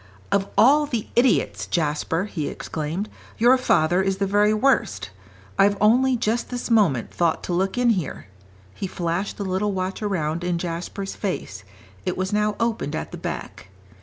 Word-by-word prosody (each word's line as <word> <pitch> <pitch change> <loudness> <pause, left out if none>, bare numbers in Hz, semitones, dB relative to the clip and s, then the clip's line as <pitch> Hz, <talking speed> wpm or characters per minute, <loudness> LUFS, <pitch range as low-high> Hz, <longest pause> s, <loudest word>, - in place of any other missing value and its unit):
"Of 200 0 +1
all 285 +8 +6
the 235 -6 -3
idiots, 240 -1 +2
Jasper," 165 +1 0
he 160 -8 -4
exclaimed, 160 +6 -4 0.3
"your 240 +3 +6
father 180 -8 +2
is 190 0 0
the 200 - 0
very 205 +2 +3
worst. 215 - +1 0.5
I've 200 +1 +5
only 250 +5 +4
just 230 +1 -1
this 245 -1 -4
moment 175 - +3
thought 170 -2 0
to 180 - -3
look 190 +5 0
in 245 -1 +4
here." 180 -10 -3 0.5
He 195 - -4
flashed 175 +2 -2
the 205 - -3
little 190 +2 0
watch 185 +1 -3
around 170 -5 -1
in 175 -1 0
Jasper's 175 +3 -4
face; 105 - -4 0.4
it - - -2
was 185 +2 -2
now 210 0 +1
opened 230 -10 -1
at - - -4
the - - -6
back. 95 - -6
195 Hz, 165 wpm, -23 LUFS, 170-220 Hz, 0.5 s, all